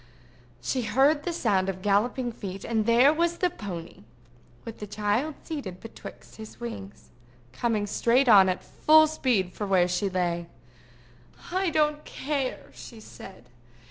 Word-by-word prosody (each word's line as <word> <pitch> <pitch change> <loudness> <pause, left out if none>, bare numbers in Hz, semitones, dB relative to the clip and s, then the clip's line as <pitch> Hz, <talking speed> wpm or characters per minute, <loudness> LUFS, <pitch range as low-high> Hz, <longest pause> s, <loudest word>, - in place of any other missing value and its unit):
She 255 - -1
heard 270 +7 +3
the 350 - -1
sound 195 - 0
of 185 -1 -5
galloping 240 +5 +1
feet, 195 -4 -7
and 220 -1 -1
there 245 +5 +5
was 340 +1 0
the 360 -1 +1
pony, 175 - -8 0.6
with 230 - -8
the 210 - -6
child 210 +9 -1
seated 225 - -6
betwixt 225 - -12
his 220 0 -11
wings, 215 -5 -8 0.4
coming 215 - -1
straight 240 +6 +2
on 195 -4 +7
at 185 - -2
full 315 0 +5
speed 250 -12 0
for 205 - -4
where 185 -2 +3
she 180 +3 -1
lay. 175 -2 -2 1.0
"I 375 0 +1
don't 300 -1 +1
care," 275 -2 -4
she 230 - -11
said. 190 - -13
225 Hz, 145 wpm, -26 LUFS, 195-275 Hz, 1.0 s, on